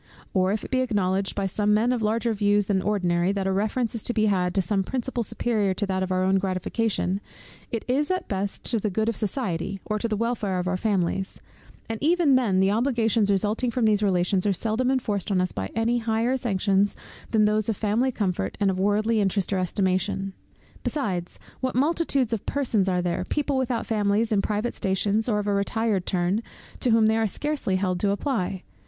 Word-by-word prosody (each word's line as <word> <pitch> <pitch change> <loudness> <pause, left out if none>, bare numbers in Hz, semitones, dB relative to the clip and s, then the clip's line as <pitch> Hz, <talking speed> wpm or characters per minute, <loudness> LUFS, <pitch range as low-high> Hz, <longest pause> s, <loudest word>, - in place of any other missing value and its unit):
Or 185 0 +2
if 210 +1 -2
it - - -10
be 260 - +2
acknowledged 195 -5 0
by 200 - -1
some 210 +2 +1
men 230 +4 +2
of 245 - -2
larger 225 +2 +1
views 205 -1 +2
than 195 -1 +1
ordinary, 180 -3 +1
that 195 -1 -2
a 195 - +1
reference 215 +4 0
is 230 - -3
to 240 - -3
be 215 -1 +3
had 180 -3 +1
to - - +4
some 200 +1 +1
principle 255 +3 -3
superior 220 -3 0
to 205 - -1
that 190 -1 -1
of 185 0 -2
our 185 0 +1
own 190 +1 +3
gratification, 195 +1 -1 0.5
it 230 - -3
is, 280 +4 +1
at 370 0 -1
best, 195 0 -3
to 230 - +2
the 210 - -1
good 220 +3 0
of 230 - -2
society, 195 -4 -2
or 215 0 -1
to 230 - -1
the 215 -2 -1
welfare 220 -4 -1
of 180 0 -2
our 185 - 0
families: 190 -1 -1 0.5
and 225 -1 -5
even 325 -1 +3
then 230 -8 +3
the 190 +1 +3
obligations 225 -2 +2
resulting 210 +5 +1
from 235 0 0
these 210 -1 +3
relations, 185 -1 +1
are 200 - +3
seldom 225 +6 -1
enforced 220 -7 -1
on 195 -2 +2
us 180 0 +2
by 95 -1 -4
any 230 +2 +1
higher 230 +2 0
sanctions 200 -4 +1 0.3
than 215 -2 +3
those 215 +1 +1
of 215 - -1
family 225 +5 +1
comfort, 185 - -2
and 200 -2 +3
of 185 - -3
worldly 210 +3 +2
interest 200 0 0
or 190 - +1
estimation. 190 +1 -1 0.5
Besides; 185 - -2 0.2
what 255 -1 -2
multitudes 280 -4 +1
of 220 - -4
persons 230 -9 +1
are 180 -1 0
there, 175 0 -1
people 290 +3 -1
without 255 -3 -1
families, 215 +1 +1
in 205 -2 +3
private 210 +4 -1
stations, 205 +4 0
or 210 - +2
of 205 - -2
a 205 - +1
retired 200 -1 0
turn, 185 +3 +1 0.4
to 250 - +1
whom 225 -1 +5
they 220 +1 +3
are 225 -1 +2
scarcely 290 -3 -2
held 185 -1 0
to 200 - +1
apply! 200 -4 -1
210 Hz, 210 wpm, -25 LUFS, 190-230 Hz, 0.5 s, whom